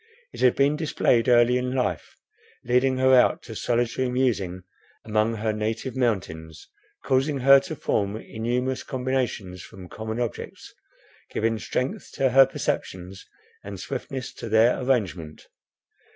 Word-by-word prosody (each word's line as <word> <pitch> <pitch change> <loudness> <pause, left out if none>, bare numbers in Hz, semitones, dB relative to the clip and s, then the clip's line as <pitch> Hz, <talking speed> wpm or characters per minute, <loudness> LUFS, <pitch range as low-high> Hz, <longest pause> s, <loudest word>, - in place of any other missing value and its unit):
It - - -10
had 125 - +4
been 140 +2 +3
displayed 130 -6 +1
early 120 +1 +5
in 125 0 -3
life, 125 - -2 0.5
leading 125 +2 +2
her 130 0 +4
out 125 - +4
to 110 - -9
solitary 120 +3 0
musing 105 -8 -1 0.4
among 110 +1 +1
her 110 0 -1
native 110 +5 -3
mountains, 85 -10 -3 0.4
causing 135 +1 +1
her 135 +1 +8
to 150 +4 -7
form 100 -6 -1
innumerous 125 +4 -3
combinations 125 -8 -3
from 95 -1 -12
common 110 +1 -5
objects, 120 -3 -5 0.6
giving 115 0 -1
strength 130 +4 -3
to 135 -2 +1
her 135 +1 +7
perceptions, 95 -7 -4 0.4
and - - -8
swiftness 130 -4 -5
to 115 - -8
their 110 +4 +3
arrangement. 95 - -2
120 Hz, 135 wpm, -25 LUFS, 110-130 Hz, 0.6 s, her